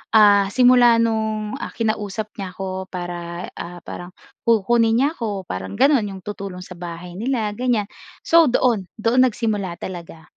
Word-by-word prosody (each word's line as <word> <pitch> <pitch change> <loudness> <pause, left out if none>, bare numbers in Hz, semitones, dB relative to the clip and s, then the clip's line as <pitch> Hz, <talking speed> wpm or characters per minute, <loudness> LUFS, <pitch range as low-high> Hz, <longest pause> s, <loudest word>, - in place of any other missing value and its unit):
Ah, 205 -2 +6
simula 245 +1 +5
no'ng, 220 +1 -1
ah, - - -6
kinausap 215 -2 -2
niya 185 -2 -6
'ko 190 -1 -5
para, 175 -1 -6
ah, 175 0 -8
parang 175 +1 -8 0.3
kukunin 225 +1 +3
niya 270 +5 +3
'ko, 215 - -4
parang 95 - -6
gano'n. 275 - +3
'Yong 190 -2 -8
tutulong 195 -3 -6
sa 180 -1 -11
bahay 175 +1 -7
nila, 230 -3 -1
ganyan. 225 -2 -1 0.3
So, 330 -2 +5
doon. 235 -6 +1
Doon 235 +4 +3
nagsimula 210 -6 -2
talaga. 170 -3 -8
210 Hz, 150 wpm, -21 LUFS, 180-230 Hz, 0.3 s, Ah